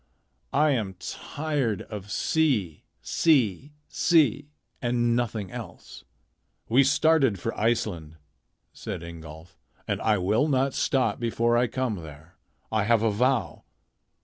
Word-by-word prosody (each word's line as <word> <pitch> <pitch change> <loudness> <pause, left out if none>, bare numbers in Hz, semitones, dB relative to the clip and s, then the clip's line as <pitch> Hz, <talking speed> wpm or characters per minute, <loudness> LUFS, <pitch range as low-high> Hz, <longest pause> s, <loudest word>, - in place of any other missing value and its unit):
I 150 +1 +4
am 105 -8 -2
tired 140 - -3
of 105 -2 -8
sea, 115 - 0 0.2
sea, 135 - +2 0.2
sea, 145 -4 +2 0.3
and 120 -1 +1
nothing 110 -5 -2
else." - - -10 0.6
"We 130 +5 +5
started 140 - +3
for 115 - -3
Iceland," 105 -8 -1 0.6
said - - -6
Ingolf, 80 0 -11 0.3
"and - - -2
I 110 -2 +2
will 105 +10 +1
not 135 -2 +1
stop 130 -2 0
before 120 0 +1
I 120 +1 +3
come 125 -3 -2
there. 80 -1 -12 0.4
I 110 -2 +1
have 115 0 +3
a 110 - +2
vow. 125 +4 0
115 Hz, 120 wpm, -26 LUFS, 100-135 Hz, 0.6 s, We